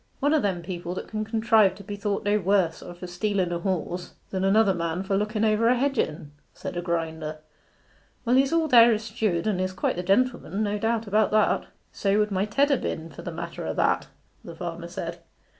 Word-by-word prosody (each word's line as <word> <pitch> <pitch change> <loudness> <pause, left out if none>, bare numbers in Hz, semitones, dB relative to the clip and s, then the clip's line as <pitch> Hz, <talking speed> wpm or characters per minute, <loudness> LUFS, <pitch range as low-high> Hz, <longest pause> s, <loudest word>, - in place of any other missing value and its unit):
'One 290 +2 +2
o' 310 - +4
them 190 -7 -1
people 175 0 -5
that - - -6
can 215 0 -3
contrive 220 -3 +3
to 200 - -11
be 205 +1 -6
thought 200 0 -2
no 205 +1 +3
worse 190 -3 +1
o' - - -9
for 175 - -8
stealen 185 0 -1
a 170 - -2
horse 180 -1 -3 0.2
than 190 -1 -1
another 200 +1 +4
man 170 +1 -2
for 195 0 -1
looken 215 +2 0
over 220 +2 +3
hedge 270 0 0
at - - +3
en,' 150 -1 -11 0.2
said - - -6
a 175 - -2
grinder. 160 -3 -3 0.9
'Well, 240 +2 +3
he's 270 +1 +4
all 330 -1 +2
there 235 -3 +7
as 215 - -5
steward, 215 -6 -1
and 200 -4 0
is 185 0 -2
quite 180 - -1
the - - -1
gentleman 200 0 +1
no 205 0 -1
doubt 225 +1 0
about 210 +1 +2
that.' 215 0 +2 0.2
'So 200 0 +1
would 210 0 +1
my 195 +1 +1
Ted 280 +7 +2
ha' 275 - +2
been, 160 0 -4
for 140 - -10
the - - -5
matter - - -6
o' - - -2
that,' - - +1 0.4
the - - -9
farmer - - -5
said. - - -6
205 Hz, 225 wpm, -26 LUFS, 180-220 Hz, 0.9 s, there